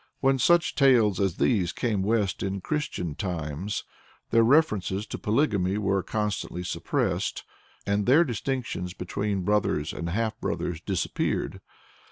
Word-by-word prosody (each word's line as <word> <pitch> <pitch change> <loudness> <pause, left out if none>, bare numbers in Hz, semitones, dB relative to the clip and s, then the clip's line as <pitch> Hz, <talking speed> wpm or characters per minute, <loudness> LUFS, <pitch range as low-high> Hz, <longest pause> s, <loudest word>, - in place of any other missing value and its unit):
" - - -48
When 135 0 +2
such 175 +5 +4
tales 120 -9 +4
as 95 -4 0
these 95 -9 +2
came 110 -5 -1
west 105 -1 0
in 95 0 -2
Christian 140 - -2
times, 85 +2 -3 0.5
their 115 - +5
references 110 - +2
to - - -6
polygamy 105 -5 +1
were 100 -2 +1
constantly 105 -4 -3
suppressed, 90 - -1 0.4
and 100 +1 0
their 145 +7 +6
distinctions 120 - -3
between 100 -2 -2
brothers 95 -7 +1
and 85 - -4
half 110 +4 -1
brothers 85 -2 -2
disappeared. 95 -2 -2
105 Hz, 135 wpm, -27 LUFS, 95-115 Hz, 0.5 s, their